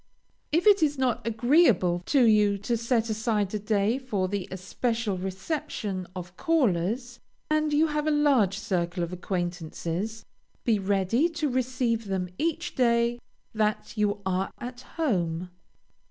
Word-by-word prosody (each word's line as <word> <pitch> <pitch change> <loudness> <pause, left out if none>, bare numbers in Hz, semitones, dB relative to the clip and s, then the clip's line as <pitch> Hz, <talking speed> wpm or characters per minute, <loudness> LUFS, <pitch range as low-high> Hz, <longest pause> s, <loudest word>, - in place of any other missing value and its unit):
If 330 +3 +2
it 410 -3 +6
is 295 -2 +2
not 250 -4 0
agreeable 230 - +3
to 275 -4 +4
you 210 -3 +4
to 205 +4 -1
set 230 -1 0
aside 215 -2 0
a 210 - -1
day 210 +3 +1
for 210 -8 -1
the 200 -1 -3
especial 215 +3 -2
reception 190 - -4
of 180 0 -7
callers, 240 - 0 0.3
and 310 0 +2
you 300 +2 +4
have 300 -1 -1
a - - +4
large 275 -10 +3
circle 180 -5 -1
of 170 +1 -4
acquaintances, 175 +3 -3 0.4
be 225 -4 +2
ready 200 - +1
to 325 -2 -2
receive 250 -3 0
them 190 -2 -2
each 335 +2 -1
day 235 -1 +2 0.3
that 215 0 -1
you 205 -1 0
are 190 +1 0
at 245 +1 -7 0.2
home. 180 - -1
220 Hz, 140 wpm, -27 LUFS, 190-260 Hz, 0.4 s, it